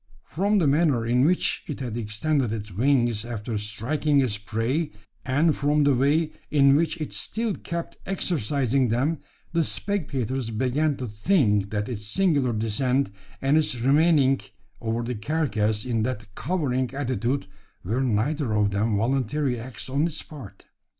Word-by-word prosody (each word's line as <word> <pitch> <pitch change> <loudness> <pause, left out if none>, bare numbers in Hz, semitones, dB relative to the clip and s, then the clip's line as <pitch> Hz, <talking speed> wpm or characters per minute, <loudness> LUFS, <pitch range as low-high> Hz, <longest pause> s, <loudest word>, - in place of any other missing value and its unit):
From 200 +5 +1
the 180 - +3
manner 140 -5 +3
in 125 +3 +3
which 180 +1 +1
it 150 - -5
had 120 -4 -4
extended 120 +4 -1
its 105 -2 -5
wings 120 +1 +2
after 115 -1 -4
striking 140 +8 0
its 125 -6 +1
prey, 115 +9 -1 0.3
and 150 +4 +2
from 145 +1 +2
the 140 -1 +4
way 145 +5 +2 0.2
in 140 -2 +5
which 165 +2 +1
it 155 - -4
still 225 -1 -1
kept 170 -1 -5
exercising 140 - +1
them, 135 +8 0 0.3
the 165 -1 +3
spectators 135 - -2
began 130 +6 0
to 125 - -4
think 105 - +2
that 105 0 -2
its 105 -4 -4
singular 140 - +2
descent, 120 +3 0 0.3
and 140 +3 +4
its 130 -6 -1
remaining 140 +1 +4 0.4
over 115 +1 -1
the 125 +2 -3
carcass 110 -4 -1
in 115 -3 0
that 110 -3 -4
cowering 130 - -1
attitude, 130 -2 -1 0.4
were 115 +8 -1
neither 130 +2 0
of 105 -1 +2
them 105 +1 +1
voluntary 130 +3 0
acts 115 -2 -7
on 140 +5 +1
its 160 -2 -4
part. 140 -10 -11
130 Hz, 150 wpm, -25 LUFS, 115-150 Hz, 0.4 s, in